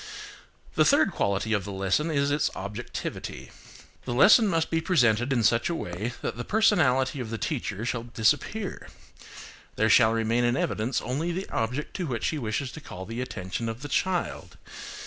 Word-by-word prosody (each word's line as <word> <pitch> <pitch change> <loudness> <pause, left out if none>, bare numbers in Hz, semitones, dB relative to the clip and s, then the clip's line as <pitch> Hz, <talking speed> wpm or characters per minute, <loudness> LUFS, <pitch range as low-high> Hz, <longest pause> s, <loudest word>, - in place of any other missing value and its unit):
The - - +4
third - - +4
quality 100 +3 0
of 100 -3 +1
the 100 - -6
lesson 95 - 0
is 140 -2 +1
its 145 +1 +1
objectivity. 100 +2 -6 0.5
The 120 - -3
lesson 220 - +7
must 165 -4 0
be 165 0 +1
presented 120 - +2
in 120 -4 +2
such 115 +5 +3
a 170 - -1
way 105 - -4
that - - -3
the 120 - -3
personality 145 - +2
of 120 -3 -4
the 115 - -3
teacher 110 -6 -3
shall 120 -1 -1
disappear. 145 - -1 0.9
There - - +2
shall 110 - +6
remain 115 +1 +1
in 120 +2 +2
evidence 115 +1 -1
only 150 +8 -2
the 185 +3 -4
object 125 +7 -2
to 180 - -2
which 120 -5 -3
she 155 - 0
wishes 125 +3 -2
to 155 - -9
call 95 -8 -8
the 115 +4 -5
attention 115 -2 -4
of 115 +4 -6
the 145 - -6
child. 185 +4 -2
125 Hz, 180 wpm, -27 LUFS, 110-150 Hz, 0.9 s, lesson